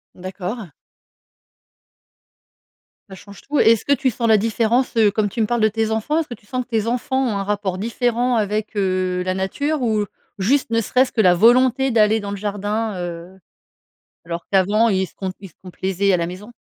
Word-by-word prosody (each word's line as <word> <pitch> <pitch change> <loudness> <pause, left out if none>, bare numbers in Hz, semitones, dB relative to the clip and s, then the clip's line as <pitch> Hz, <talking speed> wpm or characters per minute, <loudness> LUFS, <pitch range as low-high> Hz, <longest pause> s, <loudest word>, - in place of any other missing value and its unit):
D'accord. 185 +3 -6 2.4
Ça 190 - -9
change 200 +1 -14
tout. 290 +1 -2
Et 225 - +6
est - - +6
ce 220 - -10
que 280 - +3
tu 270 -2 +1
sens 230 +1 -2
la 220 -1 +6
différence? 230 +4 0
Heu, 220 -2 +5
comme 210 -1 0
tu 225 - -3
me 215 - +1
parles 240 -1 0
de 215 - +5
tes 220 +1 -1
enfants. 225 +9 0
Est - - +1
ce 310 - -22
que 240 - -7
tu 210 - -27
sens 255 +3 -3
que 245 - -34
tes 220 -3 0
enfants 250 +3 -1
ont 215 -5 -1
un 195 - -2
rapport 200 -2 -2
différent 240 +3 0
avec, 215 0 -1
heu, 185 -2 0
la 185 - 0
nature 285 +11 -2
ou 215 -3 +1 0.3
juste 255 +9 +1
ne 230 0 +1
serait-ce 255 +4 +1
que 220 - +1
la 180 -3 +5
volonté 255 +6 +4
d'aller 220 -1 +3
dans 205 -1 -6
le 200 - -4
jardin, 205 +2 -2
heu? 175 +2 -7 0.9
Alors 170 0 -5
qu'avant 205 +4 +3
ils 190 -1 +1
se - - -23
com 190 -1 -4
ils 195 - -10
se - - -28
complaisaient 190 +1 -1
à 180 - +3
la 170 -1 -1
maison 195 +6 -9
215 Hz, 215 wpm, -20 LUFS, 190-235 Hz, 2.4 s, Et